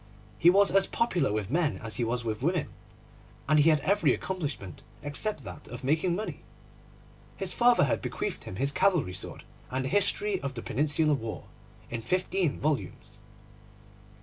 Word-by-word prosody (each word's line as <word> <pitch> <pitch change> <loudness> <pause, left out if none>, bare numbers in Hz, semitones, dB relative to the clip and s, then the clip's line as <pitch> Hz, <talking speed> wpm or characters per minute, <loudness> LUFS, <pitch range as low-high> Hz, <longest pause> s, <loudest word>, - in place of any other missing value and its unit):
He 170 - +7
was 200 +2 +5
as 195 0 +4
popular 185 - +1
with 105 0 -2
men 160 -1 +1
as 110 -1 -3
he 120 - 0
was 120 +1 -1
with 110 -1 -3
women 170 +2 0 0.8
and 155 +1 +4
he 150 +2 +6
had 155 -2 +3
every 200 +7 +3
accomplishment 145 - -5 0.2
except 145 +3 -2
that - - -9
of 125 +2 -8
making 160 +6 +1
money. 215 +3 -5 1.0
His - - -1
father 245 0 +5
had 140 - +1
bequeathed - - -4
him - - -7
his 135 +7 +1
cavalry 165 - +2
sword 90 - -2 0.3
and 130 +1 -2
a - - -2
History 205 +1 +1
of 140 -1 -4
the 115 - -6
Peninsular 150 +4 +1
War 115 -5 -4 0.5
in 115 -1 -3
fifteen 185 +2 0
volumes. 150 -1 -3
150 Hz, 165 wpm, -28 LUFS, 125-185 Hz, 1.0 s, He